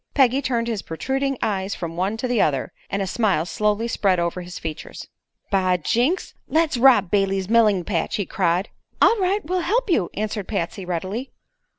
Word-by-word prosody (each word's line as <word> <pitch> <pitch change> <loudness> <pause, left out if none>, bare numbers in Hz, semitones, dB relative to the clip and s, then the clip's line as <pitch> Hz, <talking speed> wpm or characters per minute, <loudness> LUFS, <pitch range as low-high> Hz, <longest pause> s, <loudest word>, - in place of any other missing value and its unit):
Peggy 265 -1 +4
turned 235 -3 -1
his 225 -4 -2
protruding 270 +11 -2
eyes 200 -2 -1
from 165 -1 -5
one 190 +5 -1
to 255 - -2
the 245 -3 +2
other, 135 -4 0 0.2
and 200 0 -1
a - - -2
smile 195 -6 +1
slowly 210 +4 0
spread 195 -5 +1
over 170 +1 -1
his 175 0 -8
features. 160 -1 -7 0.4
"By 185 -2 +2
jinks, 245 - 0
let's 320 -2 +2
rob 240 -7 +5
Brayley's 195 -2 +1
melling 215 -4 +4
patch!" 170 -3 -1
he 200 - -1
cried. 180 +2 0 0.3
"All - - +6
right; 390 +1 0
we'll 365 +3 0
help 425 +5 0
you," 185 - +2
answered 210 -1 -3
Patsy, 195 -1 -3
readily. 185 +9 -3
205 Hz, 180 wpm, -22 LUFS, 180-250 Hz, 0.4 s, All